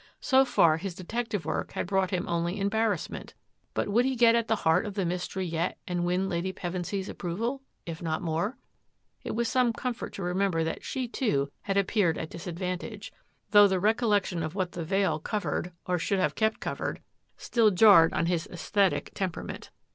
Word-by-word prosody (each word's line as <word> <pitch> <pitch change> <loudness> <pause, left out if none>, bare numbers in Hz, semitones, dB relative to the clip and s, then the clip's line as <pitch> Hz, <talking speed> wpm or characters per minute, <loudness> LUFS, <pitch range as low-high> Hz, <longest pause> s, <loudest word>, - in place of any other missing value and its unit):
So 265 -1 +4
far 165 -10 +4
his 180 +1 -5
detec 225 +7 -3
tive 205 -8 -3
work - - -3
had - - -2
brought 190 0 +1
him 180 -1 -2
only 170 +3 -1
embarrassment. 210 +2 -1 0.4
But - - +1
he - - -4
would 250 +4 +2
get 230 -1 +6
at 230 -1 +1
the 220 - +2
heart 160 +5 +3
of 205 - -6
the 195 -3 0
mystery 180 +2 -2
yet 170 +1 -2
and 175 -1 -1
win 180 +2 +1
Lady 185 0 -1
Pevensy's 185 +2 -4
approval 230 +10 -3
— - - -47
if 160 - -8
not 160 -1 -2
more. 170 - -1 0.7
It - - -4
was 235 0 0
some 245 -1 +2
comfort 245 0 -4
to 195 - -5
remember 180 -2 +1
that 160 - -3
she, 260 -2 -3
too, 145 - 0
had 200 -1 -1
appeared 195 -4 +2
at 160 - -5
disadvantage, 180 +4 -5 0.4
though 205 -1 +8
the 190 -1 0
recollection 205 -4 +1
of 155 +2 -4
what 185 -3 -1
the 170 - -5
veil 180 -2 +1
covered, 200 0 -2
or 180 -1 0
should 195 +3 0
have 185 - +1
kept 220 0 0
cov - - -4
ered, - - -2 0.4
still 230 -3 +3
jarred 190 -4 +7
on - - 0
his 170 -1 0
aesthetic 180 -3 0
temperament. 185 -3 -4
190 Hz, 195 wpm, -28 LUFS, 170-215 Hz, 0.7 s, though